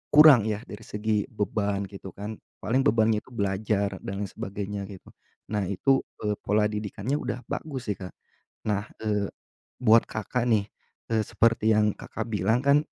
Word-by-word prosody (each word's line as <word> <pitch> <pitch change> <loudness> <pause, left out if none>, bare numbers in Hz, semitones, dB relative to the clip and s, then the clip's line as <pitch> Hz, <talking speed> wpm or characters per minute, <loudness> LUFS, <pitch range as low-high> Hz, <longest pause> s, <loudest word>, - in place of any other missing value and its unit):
kurang 145 -8 +9
ya 110 0 -2
dari 105 - -9
segi 105 0 -1
beban 105 -4 -1
gitu 95 -2 -9
kan, 105 +2 -6 0.2
paling 125 +4 +2
bebannya 110 -3 +3
itu - - -29
belajar 100 -1 0
dan 100 +1 -4
lain 100 - -4
sebagainya 100 0 -4
gitu. 95 -3 -12 0.4
Nah 105 -3 0
itu, 135 +8 +3 0.2
eee, 105 -1 -1
pola 105 +1 +2
didikannya 105 +6 -2
udah 125 - -4
bagus 130 -8 -3
sih 100 - -3
Kak. 90 -1 -8 0.5
Nah, 105 -1 -1
eee, 105 -2 0 0.5
buat 115 -1 +6
Kakak 115 +3 -2
nih, 110 -4 +2 0.4
eee, 110 -1 +2
seperti 115 0 +3
yang 105 -1 +2
Kakak 110 +1 -5
bilang 110 +3 +2
kan, 140 +1 +5
105 Hz, 165 wpm, -27 LUFS, 100-115 Hz, 0.5 s, kurang